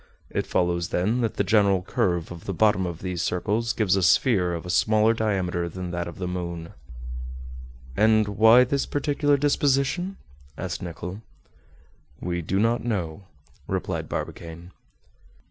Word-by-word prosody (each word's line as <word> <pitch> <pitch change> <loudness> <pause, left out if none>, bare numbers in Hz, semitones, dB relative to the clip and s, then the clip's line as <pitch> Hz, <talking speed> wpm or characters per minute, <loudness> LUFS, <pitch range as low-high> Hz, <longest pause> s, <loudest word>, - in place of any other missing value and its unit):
It - - -2
follows, 85 -1 0
then, 110 +8 +1
that 115 -3 -1
the - - +1
general 100 -2 +3
curve 85 -2 -1
of 85 -1 -9
the 95 - -3
bottom 100 -2 +3
of 85 -1 -7
these 90 -2 -2
circles 105 +6 0
gives 105 -6 +2
a 95 - +1
sphere 90 -2 +3
of 85 - -6
a 90 - -3
smaller 110 +4 +3
diameter 95 -6 -1
than 90 +1 -6
that 85 0 -3
of 85 - -8
the 90 - -3
moon." 85 -2 -4 1.3
"And 110 +2 +4
why 110 +4 +6
this 135 +2 -1
peculiar 145 0 +1
disposition?" 145 +6 +1 0.4
asked 85 -5 -4
Nicholl. 90 +3 -6 1.0
"We 85 -1 -2
do 90 +4 -1
not 115 +3 +2
know," 95 -6 -3 0.4
replied - - -3
Barbicane. 85 +1 -6
95 Hz, 145 wpm, -25 LUFS, 85-115 Hz, 1.3 s, why